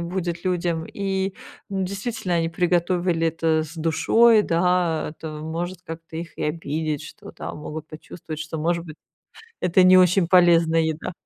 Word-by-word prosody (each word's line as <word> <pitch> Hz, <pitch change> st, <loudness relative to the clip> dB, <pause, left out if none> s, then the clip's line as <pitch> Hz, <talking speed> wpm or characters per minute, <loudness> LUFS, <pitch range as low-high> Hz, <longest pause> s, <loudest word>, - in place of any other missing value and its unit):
будет 170 Hz, 0 st, -3 dB
людям, 170 Hz, -3 st, -1 dB
и, 195 Hz, -1 st, -2 dB, 0.3 s
ну, 195 Hz, -1 st, -2 dB
действительно, 200 Hz, -1 st, -3 dB
они 165 Hz, -1 st, +1 dB
приготовили 175 Hz, 0 st, +1 dB
это 160 Hz, 0 st, +1 dB
с 155 Hz, +1 st, -9 dB
душой, 210 Hz, +8 st, +4 dB
да, 175 Hz, -3 st, +1 dB
это 160 Hz, -, -7 dB
может 170 Hz, +3 st, -4 dB
как-то 165 Hz, 0 st, -8 dB
их 165 Hz, 0 st, -7 dB
и -, -, -3 dB
обидеть, 155 Hz, -1 st, -2 dB
что, -, -, -11 dB
да, -, -, -7 dB
могут 155 Hz, +1 st, -7 dB
почувствовать, 155 Hz, 0 st, -9 dB
что, 160 Hz, 0 st, -5 dB
может 170 Hz, +2 st, 0 dB
быть, 155 Hz, -2 st, -10 dB, 0.7 s
это 180 Hz, +1 st, +4 dB
не 185 Hz, 0 st, +7 dB
очень 180 Hz, 0 st, +4 dB
полезная 170 Hz, -2 st, +5 dB
еда. 160 Hz, +2 st, -3 dB
170 Hz, 155 wpm, -23 LUFS, 160-180 Hz, 0.7 s, не